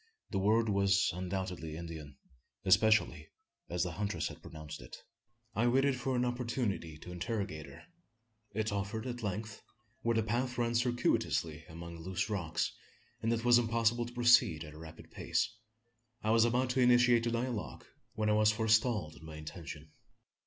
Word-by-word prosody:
The 100 - 0
word 110 +4 +3
was 100 -1 +3
undoubtedly 90 -3 -4
Indian 80 -4 -8 0.5
especially 100 -6 +4 0.4
as 90 0 0
the 90 - -2
huntress 100 +4 -2
had - - -11
pronounced 75 -3 -9
it. - - -10 0.6
I 115 +4 +2
waited 135 +2 +3
for 130 +1 -2
an 125 0 +2
opportunity 120 - -2
to 90 - -10
interrogate 90 -3 -3
her. - - -12 0.7
It 110 +1 -1
offered 100 +3 -3
at 120 -1 -4
length 105 0 -4 0.4
where 115 -1 +1
the 110 - +2
path 120 +3 -1
ran 120 -1 +1
circuitously 115 -9 0
among 85 0 -8
loose 90 +4 -2
rocks, 85 -6 -1 0.5
and 115 - +1
it 115 0 -1
was 120 0 +7
impossible 115 0 +1
to 120 - -11
proceed 120 -10 +5
at 75 -1 -10
a 75 - -12
rapid 80 0 -11
pace 110 - -1 0.7
I 110 - +2
was 115 0 +5
about 125 +1 +1
initiating 120 -2 +5
a - - +1
dialogue, 120 -5 -5 0.3
when 110 -1 0
I 105 - +4
was 105 0 +5
forestalled 110 -6 +2
in - - -15
my 80 -1 -9
intention. 75 -1 -8
105 Hz, 160 wpm, -33 LUFS, 85-120 Hz, 0.7 s, was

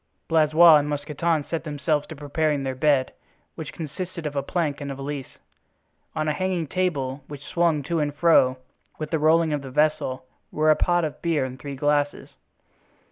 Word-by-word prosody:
Blaisois 160 0 +6
and 145 0 -1
Mousqueton 150 +2 -1
set 165 +2 -4
themselves 150 -1 -1
to 160 - -8
preparing 145 0 -1
their 135 -1 -2
bed 135 -1 +2 0.4
which 155 -3 -7
consisted 170 +2 -6
of 145 -1 -4
a 140 - +1
plank 150 -1 -2
and 140 -1 -4
a - - -5
valise. 140 -1 -6 0.8
On 155 -1 -1
a 155 - +1
hanging 185 +1 -1
table, 145 -6 -2
which 145 -1 -9
swung 170 -4 +1
to 165 +3 -1
and 145 -1 -1
fro 145 -5 +4 0.4
with 155 -1 -5
the 160 - +1
rolling 160 +1 +3
of 145 - -1
the 135 - -8
vessel, 150 -2 0 0.3
were 155 +1 +3
a - - +5
pot 175 0 +2
of 150 - -6
beer 165 -5 +1
and 130 +1 -8
three 140 -1 -6
glasses. 145 +1 0
150 Hz, 185 wpm, -24 LUFS, 140-160 Hz, 0.8 s, Blaisois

